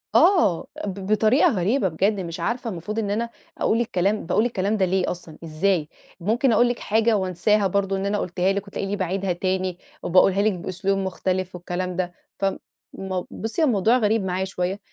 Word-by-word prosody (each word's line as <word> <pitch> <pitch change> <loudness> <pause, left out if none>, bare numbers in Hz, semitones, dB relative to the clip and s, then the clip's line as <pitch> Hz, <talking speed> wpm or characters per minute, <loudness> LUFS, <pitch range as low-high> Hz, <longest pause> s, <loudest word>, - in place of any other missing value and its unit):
آه، 345 - +4 0.2
ب 200 -1 -4
بطريقة 220 - +4
غريبة 200 +2 +1
بجد 195 +5 +1
مش 170 -1 -5
عارفة 235 +6 -2
المفروض 210 +4 -4
إن 205 -2 -1
أنا 230 +3 -1 0.3
أقول 230 +2 +2
الكلام 205 -3 0
باقول 195 +6 +2
الكلام 215 -2 0
ده 190 - +3
ليه 185 0 0
أصلًا؟ 170 -3 -9
إزاي؟ 165 0 0 0.3
ممكن 230 +8 +2
أقول 240 +2 +4
لِك 245 - -2
حاجة 220 +1 +2
وأنساها 195 +2 +2
برضه 195 +1 0
إن 195 - -2
أنا 205 +1 0
قلتها 180 +1 0
لِك، 200 0 -3
وتلاقيني 200 0 -3
باعيدها 190 -1 -1
تاني 185 0 -1 0.3
وباقولها 190 +2 +4
لِك 215 - +3
بأسلوب 185 +2 -2
مختلف 185 -1 -2
والكلام 180 +1 -4
ده، 175 -1 -2 0.3
ف 195 - 0 0.5
مو 185 -2 -4
بصي 225 +9 -3
هو - - +5
الموضوع 225 +2 +3
غريب 220 -2 +2
معايا 185 +1 -1
شوية، 190 +1 -3
195 Hz, 180 wpm, -23 LUFS, 180-215 Hz, 0.5 s, هو